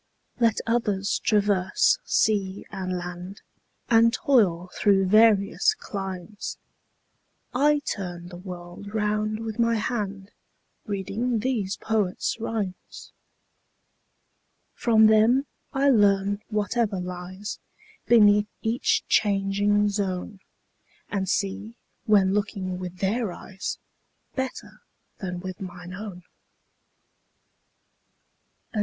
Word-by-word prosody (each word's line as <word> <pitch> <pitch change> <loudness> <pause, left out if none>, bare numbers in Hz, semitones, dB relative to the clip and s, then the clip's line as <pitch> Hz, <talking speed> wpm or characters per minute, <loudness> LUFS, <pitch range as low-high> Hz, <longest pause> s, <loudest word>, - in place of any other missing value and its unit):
Let 230 -2 +3
others 210 -4 0
traverse 205 - +2
sea 200 - +1
and 185 -2 -3
land, 180 +2 -7 0.4
And 230 0 +5
toil 190 -10 +2
through 195 -2 +3
various 215 - +4
climes, 195 - -6 1.0
30 255 +3 0
I - - 0
turn 175 -3 -4
the 175 - -10
world 180 +2 -9
round 215 0 0
with 225 0 -5
my 230 0 +3
hand 205 -3 -3 0.6
Reading 215 +4 -1
these 220 -6 -1
poets' 215 0 -1
rhymes. 215 -5 -5 1.6
From 220 -3 +4
them 220 +5 +5 0.3
I 275 0 +3
learn 200 -2 +3
whatever 210 -1 0
lies 180 +3 -6 0.5
Beneath 210 -3 +6 0.2
each 225 +2 +1
changing 205 0 +2
zone, 195 -1 -3 0.7
And 190 -2 -2
see, 205 +4 -2 0.3
when 195 -3 +4
looking 195 -3 -2
with 180 0 -6
their 205 +2 0
eyes, 190 +2 -6 0.6
35 - - -34
Better 260 -1 -5 0.4
than 180 -2 -4
with 185 0 -7
mine 180 -1 -8
own. 190 -2 -8 2.5
H. - - -40
W. 215 - -1
205 Hz, 100 wpm, -25 LUFS, 190-220 Hz, 2.5 s, Beneath